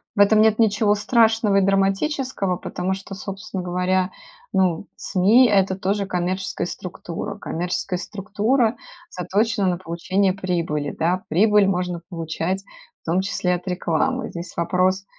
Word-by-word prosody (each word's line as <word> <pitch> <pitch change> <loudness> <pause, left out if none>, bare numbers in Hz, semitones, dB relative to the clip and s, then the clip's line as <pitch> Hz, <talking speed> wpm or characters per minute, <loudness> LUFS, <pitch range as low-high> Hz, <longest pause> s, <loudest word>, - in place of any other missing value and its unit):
в 205 - -4
этом 215 +1 +6
нет 220 0 +4
ничего 210 -1 +3
страшного 220 -1 +3
и - - +5
драматического, 195 - +1
потому 185 +1 -3
что, 195 +1 -7
собственно 190 -1 -6
говоря, 180 +1 0 0.4
ну, 185 -1 +1
СМИ- 215 +7 +4
это 195 -2 +3
тоже 200 +2 -1
коммерческая 185 -1 -2
структура. 175 +1 -6
Коммерческая 180 -1 -3
структура 215 +5 0 0.3
заточена 200 +4 0
на 180 -1 +1
получение 185 +3 0
прибыли, 170 -6 -2
да. 180 +4 0
Прибыль 210 +4 +4
можно 180 -2 -1
получать 165 +2 -3 0.4
в - - -57
том 175 +3 +1
числе 180 -2 0
от 180 +2 -8
рекламы. 190 +8 -1
Здесь 170 0 -8
вопрос, 185 +3 +1
190 Hz, 135 wpm, -22 LUFS, 180-205 Hz, 0.4 s, этом